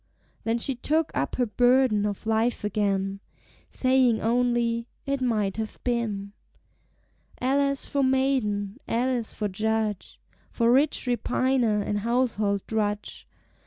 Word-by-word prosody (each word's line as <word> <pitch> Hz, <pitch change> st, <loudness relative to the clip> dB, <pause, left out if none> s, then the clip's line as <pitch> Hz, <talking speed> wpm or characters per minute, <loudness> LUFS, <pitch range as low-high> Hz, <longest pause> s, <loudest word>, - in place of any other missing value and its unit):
Then 225 Hz, +1 st, +1 dB
she 270 Hz, +3 st, -1 dB
took 310 Hz, +6 st, 0 dB
up 135 Hz, -, -1 dB
her 250 Hz, -, +1 dB
burden 245 Hz, -2 st, +3 dB
of 205 Hz, 0 st, -5 dB
life 225 Hz, +2 st, +1 dB
again, 195 Hz, -1 st, -1 dB, 0.5 s
Saying 255 Hz, -3 st, +3 dB
only, 235 Hz, 0 st, +1 dB, 0.2 s
"It 275 Hz, -1 st, -1 dB
might 215 Hz, -6 st, 0 dB
have 220 Hz, -1 st, -5 dB
been." 215 Hz, -5 st, -2 dB, 1.1 s
Alas 275 Hz, +2 st, +1 dB
for 280 Hz, -, -1 dB
maiden, 260 Hz, -6 st, 0 dB
alas 240 Hz, -1 st, -1 dB
for 210 Hz, -, -1 dB
judge, 215 Hz, 0 st, -2 dB, 0.3 s
For 235 Hz, 0 st, +2 dB
rich 285 Hz, +2 st, +3 dB
repiner 245 Hz, -3 st, +1 dB
and 205 Hz, -, -1 dB
household 215 Hz, -3 st, 0 dB
drudge! 210 Hz, -1 st, -3 dB
230 Hz, 120 wpm, -26 LUFS, 210-255 Hz, 1.1 s, burden